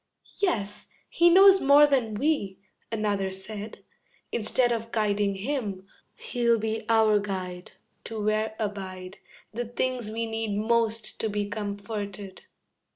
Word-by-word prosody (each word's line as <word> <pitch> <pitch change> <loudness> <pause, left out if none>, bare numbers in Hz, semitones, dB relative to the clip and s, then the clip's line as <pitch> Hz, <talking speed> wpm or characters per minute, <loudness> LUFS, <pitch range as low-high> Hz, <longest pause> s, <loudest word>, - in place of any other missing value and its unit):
"Yes, 205 - -1 0.2
he 345 0 +5
knows 385 +2 +7
more 285 +2 +7
than 255 -7 +1
we," 210 -7 0 0.3
another 205 -3 -1
said, 205 +3 -8 0.5
"Instead 240 +2 +1
of 230 -1 -3
guiding 205 -2 +1
him, 205 -4 -3 0.3
he'll 235 -1 +1
be 220 0 -2
our 220 -2 +4
guide 185 -3 -5 0.3
To 225 -1 -5
where 215 +1 0
abide 190 -3 -5 0.3
The 240 +2 -3
things 245 -1 -2
we 230 +1 -2
need 225 -2 -2
most 225 0 0
to 220 - -1
be 205 0 -2
comforted." 205 -1 -5
215 Hz, 125 wpm, -27 LUFS, 200-235 Hz, 0.5 s, knows